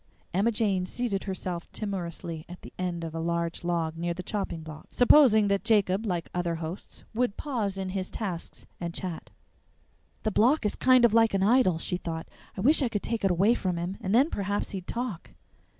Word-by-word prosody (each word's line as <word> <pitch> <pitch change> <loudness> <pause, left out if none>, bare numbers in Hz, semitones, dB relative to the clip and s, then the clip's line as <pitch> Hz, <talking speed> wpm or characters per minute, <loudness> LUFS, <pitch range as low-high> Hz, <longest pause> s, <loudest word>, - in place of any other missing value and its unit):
Emma 200 +6 +3
Jane 200 -5 0
seated 215 -3 -2
herself 185 -3 -4
timorously 170 -5 -4
on 180 - -8
the - - -11
end 175 -2 -2
of 165 -1 -5
a 165 - -3
large 170 0 -2
log 165 -2 -1
near 170 +1 -2
the 185 - -6
chopping 185 -4 -3
block, 155 -1 -10
supposing 245 -5 +6
that 200 0 +1
Jacob, 210 -2 +2
like 175 -3 -1
other 175 -1 -1
hosts, 165 +3 -7
would 235 -2 0
pause 220 -9 -2
in 190 -1 -3
his 185 -1 -3
tasks 185 -7 -5
and 170 -1 -4
chat. 180 -4 -5 0.9
"The 215 - 0
block 240 +6 +3
is 210 - +1
kind 255 -1 +5
of 225 - +3
like 225 -2 +4
an 190 - +2
idol," 215 -5 +4
she 180 +2 -2
thought; 165 -2 -5 0.3
"I - - -2
wish 295 +7 +4
I 255 - +2
could 205 -3 -2
take 230 -3 -2
it 195 - +4
away 190 +6 +4
from 185 -7 -1
him, 175 +3 -3
and 190 - -2
then 275 +7 +4
perhaps 200 +1 -2
he'd 185 -2 -6
talk." 235 -7 -4
190 Hz, 200 wpm, -28 LUFS, 170-220 Hz, 0.9 s, supposing